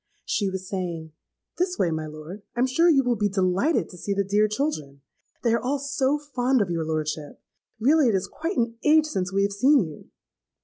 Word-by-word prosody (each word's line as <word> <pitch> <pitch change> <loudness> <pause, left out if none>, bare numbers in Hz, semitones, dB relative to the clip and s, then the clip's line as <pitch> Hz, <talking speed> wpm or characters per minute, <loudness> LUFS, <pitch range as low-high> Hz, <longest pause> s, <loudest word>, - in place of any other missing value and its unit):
She 200 -2 0
was 190 0 -5
saying, 170 -4 -4 0.5
'This 360 0 0
way, 175 - +1
my 160 -1 -3
lord: 155 +6 -9
I - - -4
am - - +5
sure 330 +7 +3
you 275 -4 +4
will 245 -1 +1
be 205 -1 0
delighted 190 - +1
to 180 - -12
see 200 +3 -2
the 200 - +1
dear 205 +2 +2
children. 205 - -3 0.4
They 230 -2 +3
are 235 - +2
all 270 +3 0
so 280 0 0
fond 265 -3 0
of 195 -5 0
your 165 -1 -1
lordship! 155 -1 -3 0.4
Really 285 +4 +4
it 215 - +2
is 190 0 0
quite 330 - -4
an 230 -1 -1
age 310 0 +5
since 190 -11 -2
we 195 +1 +2
have 200 0 0
seen 260 +5 +4
you!' 155 -3 -10
205 Hz, 215 wpm, -25 LUFS, 180-275 Hz, 0.5 s, am